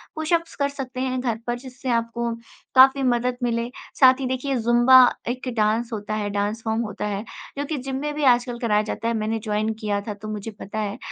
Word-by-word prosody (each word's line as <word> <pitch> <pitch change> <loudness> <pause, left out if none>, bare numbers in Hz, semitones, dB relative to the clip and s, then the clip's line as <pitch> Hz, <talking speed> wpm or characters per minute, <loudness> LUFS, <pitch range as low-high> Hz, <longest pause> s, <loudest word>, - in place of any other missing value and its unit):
Pushups 330 +2 -1
कर 280 -1 0
सकते 260 -2 -6
हैं 255 -1 -1
घर 235 -3 -1
पर, 240 - 0
जिससे 260 0 -7
आपको 235 0 -1 0.4
काफ़ी 265 +1 +7
मदद 245 0 +1
मिले। 235 0 0 0.3
साथ 260 0 +7
ही 265 - -2
देखिए, 260 +1 -1
ज़ुम्बा 240 +2 +5 0.3
एक 255 +1 -4
डांस 220 +2 +1
होता 210 0 -4
है, 205 -1 -2
डांस 205 +2 -2
फॉर्म 220 +1 0
होता 210 -2 -4
है, 205 +1 -3 0.3
जो 285 - -2
कि 305 0 -3
जिम 265 +1 -4
में 295 0 -2
भी 300 - -2
आजकल 240 0 -3
कराया 210 -3 +2
जाता 225 +1 -4
है। 230 - +1
मैंने 220 0 -1
जॉइन 215 0 0
किया 205 -2 -1
था, 210 0 -5
तो 210 +1 -10
मुझे 215 +1 -5
पता 215 +2 -5
है। 210 +2 -3
235 Hz, 215 wpm, -23 LUFS, 215-260 Hz, 0.4 s, काफ़ी